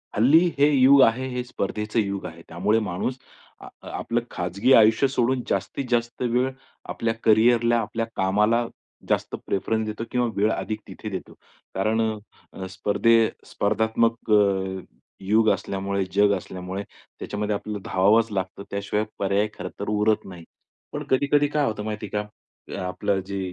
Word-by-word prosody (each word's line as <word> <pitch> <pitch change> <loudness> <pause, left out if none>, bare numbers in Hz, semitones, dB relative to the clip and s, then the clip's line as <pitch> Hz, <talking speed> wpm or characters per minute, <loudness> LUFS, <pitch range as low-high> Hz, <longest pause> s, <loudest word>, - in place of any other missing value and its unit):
हल्ली 130 +9 +6 0.2
हे 145 +1 +5
युग 135 0 +6
आहे, 125 +3 +2
हे 125 -1 -3
स्पर्धेचं 105 -1 -3
युग 100 -2 -2
आहे. 85 0 -8
त्यामुळे 100 +7 +1
माणूस 110 +8 -2 0.4
अ, - - -10 0.2
आपलं 120 +1 -2
खाजगी 95 +8 0
आयुष्य 110 +4 +6
सोडून 130 -1 0
जास्तीत 100 +8 -2
जास्त 120 0 -1
वेळ 125 +1 +1 0.4
आपल्या 115 0 -1
कॅरियरला 115 +2 +4
आपल्या 115 +1 -3
कामाला 105 +5 +2 0.4
जास्त - - 0
प्रिफरन्स 110 +3 -1
देतो 110 +1 -4
किंवा 125 -1 +1
वेळ 105 +2 +2
अधिक 110 -1 -3
तिथे 110 - -7
देतो. 95 -3 -6 0.4
कारण 110 +4 +1 0.7
स्पर्धे 105 +4 +2 0.2
स्पर्धात्मक 110 +2 0
अ, - - +7 0.9
युग 110 +3 +3
असल्यामुळे 100 0 -1
जग 100 0 +4
असल्यामुळे 95 +2 -6
त्याच्यामध्ये 105 +1 -5
आपल्याला 105 0 -5
धावावाच 105 +4 +3
लागतं 95 0 -4
त्याशिवाय 100 +2 -1
पर्याय 100 +2 +1
खरंतर 100 - -7
पुरत 105 0 +1
नाही. 90 -3 -10 0.5
पण - - -4
कधी-कधी 145 +2 +3
काय 150 -1 +2
होतं 110 -4 -3
माहिती 105 0 -4
आहे 105 - 0 0.5
का - - -4
आपलं 100 +2 -1
जे 100 0 -4
110 Hz, 145 wpm, -24 LUFS, 100-115 Hz, 0.9 s, अ